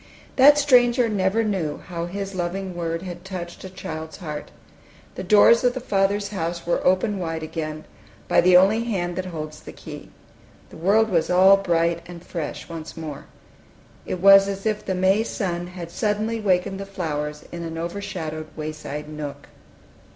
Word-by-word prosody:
That 285 +2 +7
stranger 250 -4 +4
never 205 +1 +1
knew 190 -8 -1
how 170 -1 -5
his 195 +2 -5
loving 185 +1 -3
word 165 0 -3
had 175 -2 -7
touched 180 -3 -7
a 190 - -7
child's 160 -4 -7
heart. 150 -5 -6 0.6
The - - -6
doors 210 +5 +6
of 245 0 +2
the - - -2
Father's 200 -2 0
house 170 -3 -4
were 170 - 0
opened 190 +2 +2
wide 165 -2 -3
again, 155 -1 -5 0.4
by - - +4
the 180 0 +7
only 210 +5 +4
hand 175 -6 -2
that 185 0 -3
holds 155 -3 -6
the - - -10
key. - - -10 0.6
The - - -11
world 210 +7 +3
was 165 -3 +1
all 190 +2 +7
bright 170 -3 +1
and 175 -1 -10
fresh 165 -4 -5
once 165 -1 -8
more. 155 -3 -7 0.8
It 185 - -4
was 195 +1 +8
as 195 0 -5
if 210 -1 0
the 190 - -2
May 190 +3 +3
sun 175 -6 -3
had 175 -2 -8
suddenly 215 +3 -1
wakened 195 -1 +1
the 195 - -6
flowers 150 -6 -4
in 170 - -6
an 165 -1 -5
overshadowed 170 -3 -5
wayside 155 -1 -5
nook. 145 -2 -7
180 Hz, 170 wpm, -23 LUFS, 165-200 Hz, 0.8 s, was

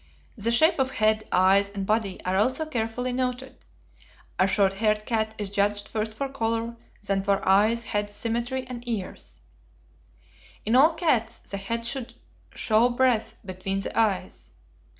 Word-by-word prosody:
The 225 -1 -2
shape 305 +7 +4
of 265 0 +2
head, 215 -3 +1
eyes, 195 +2 +4
and 200 -1 -5
body 210 -2 0
are 185 +1 0
also 255 +10 +1
carefully 245 -2 -2
noted. 255 +1 -3 0.8
A 185 - +5
short 195 0 +3
haired 210 +1 0
cat 220 -2 -1
is 205 -2 -4
judged 205 0 0
first 215 0 -3
for 275 +4 -2
color, 230 -3 -2 0.3
then 195 -1 0
for 200 0 0
eyes, 215 +5 +4
head, 205 -2 -2
symmetry, 235 +5 -3
and 245 -2 -7
ears. 215 -6 -5 1.2
In 220 +3 +2
all 310 +5 +6
cats 245 -9 +1
the 200 - -8
head 230 +4 -3
should 255 0 -4 0.4
show 225 +2 +3
breadth 245 -2 +1
between 195 +1 -3
the - - -5
eyes. 195 - -1
220 Hz, 150 wpm, -26 LUFS, 200-245 Hz, 1.2 s, all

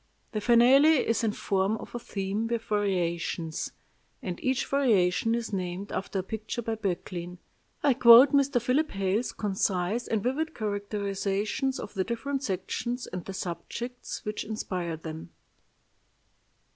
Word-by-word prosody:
The 215 - -2
Finale 260 +6 +6
is 230 +1 +1
in 220 - +2
form 200 +1 0
a 240 - -7
theme 205 0 -3
with 230 -1 -2
variations, 170 -5 -1 0.5
and 180 -3 -6
each 260 -1 +1
variation 225 -5 +2
is 230 -3 -4
named 185 +1 -3
after 195 +1 -3
a 190 - 0
picture 220 +4 -5
by 225 - -2
Böcklin. 180 -3 -4 0.5
I 285 -2 +5
quote 245 +2 +9
Mr. 280 -2 +3
Philip 260 +6 +1
Hale's 195 +4 -1
concise 195 +2 -1
and 220 -3 0
vivid 315 +6 -1
characterizations 205 +4 -2
of - - -7
the 190 -3 0
different 260 +6 -3
sections 240 +3 -3
and 180 -1 -6
the 195 - -6
subjects 190 +8 -5
which 210 0 -3
inspired 180 -6 -4
them: 160 0 -7
"I. - - -42
210 Hz, 140 wpm, -28 LUFS, 190-240 Hz, 0.5 s, quote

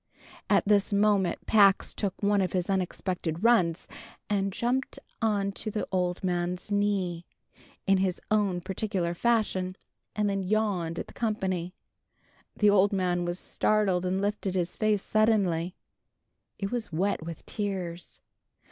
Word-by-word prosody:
At - - +3
this 205 -1 +3
moment 200 -3 +2
Pax 200 -3 +4
took 200 -1 -4
one 200 0 +3
of 185 -2 -1
his 185 +1 0
unexpected 180 -2 -2
runs, 190 -8 +3 0.4
and 195 -1 +1
jumped 250 +6 -1 0.2
on 205 -3 +1
to 215 - -4
the 210 0 -3
old 180 -1 -1
man's 180 +2 -2
knee, 195 -4 0 0.6
in 195 -1 +4
his 185 -2 0
own 200 -4 +2
particular 185 -2 -2
fashion, 190 -3 0 0.4
and 210 -1 +1
then 195 -1 0
yawned 190 -4 0
at - - -3
the - - -15
company. 185 -6 -2 0.8
The 210 -1 +4
old 200 0 +4
man 180 -3 0
was 175 0 -2
startled, 195 -3 +1
and 185 +1 0
lifted 200 -1 -1
his 180 -1 -1
face 215 -2 +1
suddenly. 195 -6 +1 0.8
It 195 -1 -3
was 235 -5 -2
wet 185 +2 0
with 165 0 -8
tears. 185 -5 -4
195 Hz, 140 wpm, -28 LUFS, 180-210 Hz, 0.8 s, Pax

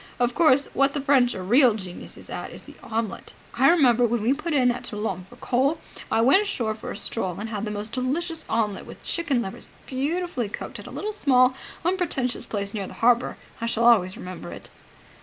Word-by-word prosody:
Of 245 0 +2
course, 285 -3 +4
what 275 +1 +2
the - - 0
French 270 -3 +3
are 185 - -5
real 240 +3 +5
geniuses 185 -4 -8
at - - -5
is - - -11
the - - -13
omelet. 225 -2 -4 0.2
I 265 +3 +5
remember, 250 -8 +5
when 235 -2 +1
we 245 +4 +3
put 310 +4 -4
in 255 -4 +4
at 245 +1 -5
Toulon 210 -5 -3
for - - -14
coal, 270 +5 +1 0.3
I 225 - +3
went 270 - +6
ashore 245 - -1
for 215 - -8
a - - -5
stroll, 190 -4 -2
and 220 +2 -4
had 215 -1 -3
the - - -3
most 210 +1 -4
delicious 320 +7 -2
omelet 215 -3 -1
with - - -12
chicken 295 -8 0
livers 195 +5 -8 0.2
beautifully 280 - -2
cooked, - - -6
at - - -10
quite - - -6
a 430 - -2
small, 255 -9 +4 0.3
unpretentious 325 -10 -1
place 200 -2 -3
near 200 -3 -3
the - - -10
harbour. 240 +1 +2 0.2
I 230 - -1
shall 235 0 +1
always 190 -6 +5
remember 180 0 -8
it." - - -10
245 Hz, 210 wpm, -25 LUFS, 215-275 Hz, 0.3 s, went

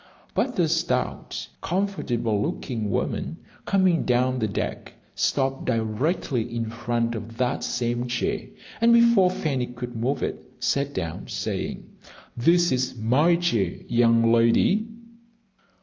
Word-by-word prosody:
But 255 -3 0
a 175 - +3
stout, 165 -5 -1
comfortable 120 - -1
looking 110 0 -3
woman - - -2 0.3
coming 185 -4 +3
down 125 +1 +1
the 110 - +1
deck 100 - -4 0.2
stopped 135 -1 0
directly 120 - -1
in 115 -1 -2
front 115 0 -1
of 115 0 -7
that 125 +1 0
same 120 0 -1
chair, 120 0 -2 0.3
and 235 +1 +6
before 235 -5 +6
Fanny 140 -8 -1
could 125 0 -7
move 125 +5 -1
it, - - -3 0.2
sat 140 0 0
down, 85 -4 -4
saying, - - -4 0.5
"This 170 +8 +3
is 130 0 -1
my 130 +10 +3
chair, 115 - 0
young 115 -1 +4
lady." 115 - +3
125 Hz, 125 wpm, -25 LUFS, 115-165 Hz, 0.5 s, and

